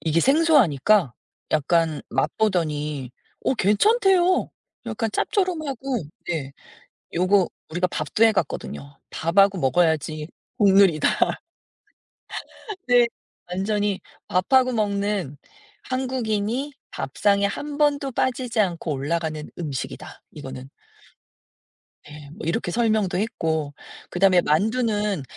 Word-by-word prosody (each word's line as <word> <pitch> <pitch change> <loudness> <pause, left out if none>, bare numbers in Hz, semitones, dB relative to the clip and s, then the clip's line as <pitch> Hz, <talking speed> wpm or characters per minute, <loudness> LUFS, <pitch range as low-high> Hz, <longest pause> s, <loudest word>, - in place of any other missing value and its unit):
이게 165 +1 +1
생소하니까 215 - +4 0.4
약간 155 +1 +1
맛보더니 150 - -1 0.3
어 - - +2
괜찮대요 370 - +3 0.4
약간 225 0 -2
짭조름하고. 275 - -1 0.2
네. 150 -6 -3 0.6
요거 185 +2 +3 0.2
우리가 180 +3 0
밥도 155 +7 0
해 225 - +7
갔거든요. 140 -6 -4
"밥하고 195 +4 +3
먹어야지 155 0 +1 0.3
국룰이다." 195 -7 +5 1.8
네. 245 -1 +5 0.4
"완전히 205 +1 -1 0.3
밥하고 255 +8 +3
먹는, 200 - -1 0.5
한국인이 255 0 -2 0.2
밥상에 200 +8 +1
1 290 +8 -4
번도 285 -2 +1
빠지지 250 -1 -1
않고 175 -5 0
올라가는 155 +2 -3
음식이다 145 -7 -6
이거는." 130 -2 -9 1.4
네. 150 -1 -11
뭐 160 - -8
이렇게 170 +1 -1
설명도 215 -4 +1
했고 160 - -2 0.4
그다음에 185 0 +4
만두는 210 - 0
195 Hz, 235 characters per minute, -23 LUFS, 160-235 Hz, 1.8 s, 해